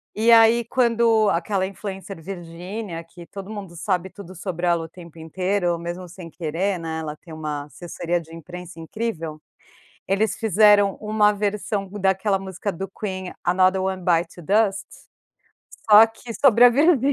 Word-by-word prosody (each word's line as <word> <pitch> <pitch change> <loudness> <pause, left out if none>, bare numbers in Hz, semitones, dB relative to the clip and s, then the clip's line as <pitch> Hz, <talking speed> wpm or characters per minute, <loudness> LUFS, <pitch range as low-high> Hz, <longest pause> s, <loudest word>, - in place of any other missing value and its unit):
E, 225 +2 +3
aí, 230 +1 +6
quando 230 -3 +3
aquela 190 +2 0
influencer 195 -2 -8
Virgínia, 175 +1 -7
que 170 +1 -14
todo 195 0 -9
mundo 195 -5 -8
sabe 185 +1 -2
tudo 190 -1 -12
sobre 180 -1 -4
ela 170 -1 +2
o - - -12
tempo 170 -1 -13
inteiro, 180 +2 -1
mesmo 175 +2 -6
sem 175 -1 -10
querer, 175 +4 -2
né, 160 -1 -4
ela 150 -1 -5
tem 165 +1 -14
uma 150 -2 -4
assessoria 175 +2 -4
de 165 0 -15
imprensa 175 +1 -10
incrível, 165 -4 -5 0.7
eles 200 +1 +1
fizeram 205 -2 +4
uma 210 -1 +2
versão 205 -1 -2
daquela 195 0 +1
música 190 +1 -4
do 190 +3 -6
Queen, 190 -2 -5
"Another 185 +1 +3
One 190 -1 -3
Bites 170 -1 +1
the 175 - -11
Dust" 200 +3 +1 1.1
só 210 +2 +10
que 225 +1 -10
sobre 245 -3 +4
a - - +10
Virgínia, 285 0 +3
190 Hz, 160 wpm, -23 LUFS, 170-210 Hz, 1.1 s, só